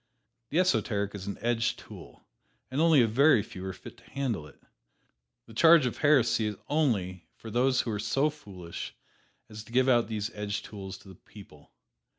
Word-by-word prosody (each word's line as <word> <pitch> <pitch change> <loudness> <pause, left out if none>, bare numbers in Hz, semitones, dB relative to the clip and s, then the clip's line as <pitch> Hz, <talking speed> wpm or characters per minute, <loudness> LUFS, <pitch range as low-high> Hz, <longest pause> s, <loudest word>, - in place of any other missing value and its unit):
The 155 - -1
esoteric 105 - +1
is 100 -1 -7
an 100 - -4
edged 120 0 0
tool, - - -13 0.5
and 135 +4 0
only 160 -6 +6
a - - +2
very 130 0 +4
few 95 - -10
are - - -3
fit - - -12
to - - -20
handle 125 - -3
it. 70 - -19 0.9
The 115 - -14
charge 160 +5 +6
of 125 - -2
heresy 125 -7 +3
is 105 - -3
only 100 - 0
for 110 - -10
those 130 +3 +2
who 115 - -4
are 105 - -3
so 135 +8 +1
foolish 95 - -9 0.5
as 105 0 -9
to 115 - -17
give 130 +2 +3
out 120 -4 +4
these 110 0 -3
edged 105 0 -4
tools 95 -2 -8
to - - -18
the 95 - -11
people. 90 -5 -16
115 Hz, 185 wpm, -28 LUFS, 100-135 Hz, 0.9 s, only